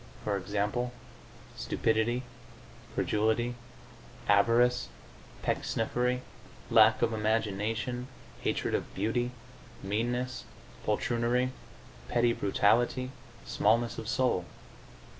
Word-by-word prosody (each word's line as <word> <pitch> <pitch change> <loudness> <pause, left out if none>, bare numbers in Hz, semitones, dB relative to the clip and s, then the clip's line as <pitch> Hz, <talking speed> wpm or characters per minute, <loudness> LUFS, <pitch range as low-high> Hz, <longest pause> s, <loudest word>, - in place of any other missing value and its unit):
For 105 - 0
example, 105 +5 -1 0.6
stupidity, 115 +3 0 0.7
credulity, 110 +3 +1 0.7
avarice, 115 +5 +4 0.6
pecksniffery, 125 +2 0 0.5
lack 110 0 +6
of 115 -1 +2
imagination, 110 +3 -1 0.3
hatred - - -1
of - - -2
beauty, 115 +5 0 0.5
meanness, 120 +5 -1 0.4
poltroonry, 120 +3 +1 0.6
petty 120 0 +3
brutality, 120 +5 +2 0.3
smallness 115 +3 +2
of 110 - -7
soul.... 120 -7 +1
115 Hz, 75 wpm, -30 LUFS, 105-125 Hz, 0.7 s, lack